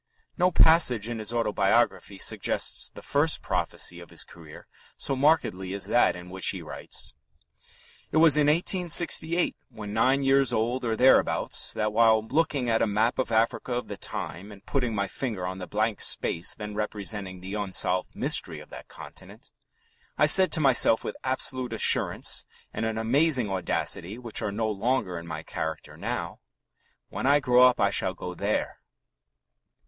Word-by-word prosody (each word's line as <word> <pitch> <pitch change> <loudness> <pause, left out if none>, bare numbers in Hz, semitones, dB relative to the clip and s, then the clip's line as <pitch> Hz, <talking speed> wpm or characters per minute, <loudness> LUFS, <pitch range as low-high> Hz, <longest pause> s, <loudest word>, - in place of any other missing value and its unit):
No 180 -1 +2
passage 160 - +4
in 120 -2 -4
his 110 0 -1
autobiography 105 -2 0
suggests - - -1
the - - -13
first - - +1
prophecy 85 - -3
of 85 - -13
his - - -6
career 80 -3 -14 0.3
so 135 - 0
markedly 130 - +1
as 100 - -5
that 120 - +2
in 90 0 -11
which 95 0 -1
he - - -2
writes: - - -6 1.0
"It - - 0
was 160 -2 +7
in 150 -1 +4
1868, 170 +1 +2
when 105 -4 -8
nine 130 +5 +2
years 135 -1 +3
old 120 +3 -1
or 115 -2 -1
thereabouts, 130 +4 +2
that 105 -1 -2
while 110 -1 +3
looking 145 -2 0
at 115 -1 +1
a - - +2
map 110 +4 0
of 130 - -1
Africa 115 +2 0
of 120 0 -4
the - - -5
time 95 +7 -6
and 100 0 -15
putting 125 -5 -2
my 100 -1 -1
finger 105 -4 -4
on 95 +1 -5
the 90 - -7
blank 110 +1 -1
space 85 - 0
then 105 0 -7
representing 105 -2 -3
the 95 +2 -8
unsolved 95 -3 -1
mystery - - 0
of - - -15
that - - -11
continent, - - -12 0.7
I - - +4
said 185 +5 +6
to - - +3
myself 130 -5 +4
with - - -5
absolute 130 -1 -2
assurance - - +2 0.3
and 110 - -2
an 110 0 -3
amazing 125 0 +2
audacity 95 +1 -2
which 120 -3 -5
are 105 - -2
no 110 +2 -2
longer 105 -3 -2
in 85 - -11
my 80 -1 -6
character 80 0 -6
now: - - -5 0.7
'When - - -3
I 145 +1 +5
grow 125 -2 +3
up 125 - 0
I 100 0 +2
shall 95 -2 -1
go 90 0 -7
there.'" 100 +4 -3
110 Hz, 170 wpm, -26 LUFS, 100-130 Hz, 1.0 s, was